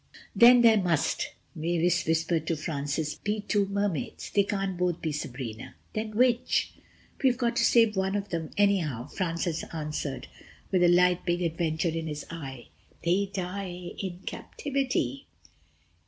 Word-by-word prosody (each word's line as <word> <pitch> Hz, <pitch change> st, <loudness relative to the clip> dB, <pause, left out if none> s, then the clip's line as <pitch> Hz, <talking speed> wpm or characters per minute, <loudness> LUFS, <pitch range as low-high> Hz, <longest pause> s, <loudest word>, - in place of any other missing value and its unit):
"Then 245 Hz, +1 st, +8 dB
there 225 Hz, -3 st, +6 dB
must," 170 Hz, -5 st, +1 dB, 0.3 s
Mavis 175 Hz, +1 st, +1 dB
whispered 160 Hz, 0 st, +1 dB
to 165 Hz, -, +1 dB
Francis, 150 Hz, 0 st, -2 dB
"be 210 Hz, +1 st, -2 dB
two 205 Hz, -1 st, +1 dB
Mermaids. 200 Hz, -6 st, -2 dB
They 200 Hz, -, +4 dB
can't 195 Hz, -1 st, -2 dB
both 180 Hz, -1 st, 0 dB
be 160 Hz, -, -2 dB
Sabrina... 125 Hz, -6 st, -6 dB, 0.2 s
then 215 Hz, 0 st, -3 dB
which...?" 245 Hz, -1 st, +2 dB, 0.5 s
"We've 255 Hz, -2 st, +4 dB
got 240 Hz, -2 st, 0 dB
to 235 Hz, -, +3 dB
save 230 Hz, -2 st, +5 dB
one 190 Hz, +1 st, 0 dB
of 205 Hz, 0 st, -2 dB
them 165 Hz, -3 st, -3 dB
anyhow," 175 Hz, -, +2 dB
Francis 170 Hz, -1 st, -2 dB
answered 150 Hz, -3 st, -4 dB, 0.4 s
with 185 Hz, -2 st, +3 dB
the 175 Hz, -, +6 dB
light 180 Hz, 0 st, +5 dB
of -, -, -25 dB
big 175 Hz, 0 st, 0 dB
adventure 165 Hz, 0 st, 0 dB
in 165 Hz, 0 st, -3 dB
his 150 Hz, -1 st, -5 dB
eye, 135 Hz, -7 st, -8 dB, 0.3 s
"they 185 Hz, +4 st, +2 dB
die 180 Hz, -2 st, -5 dB
in 185 Hz, -2 st, -5 dB
captivity." 275 Hz, 0 st, -2 dB
175 Hz, 150 wpm, -28 LUFS, 160-205 Hz, 0.5 s, Then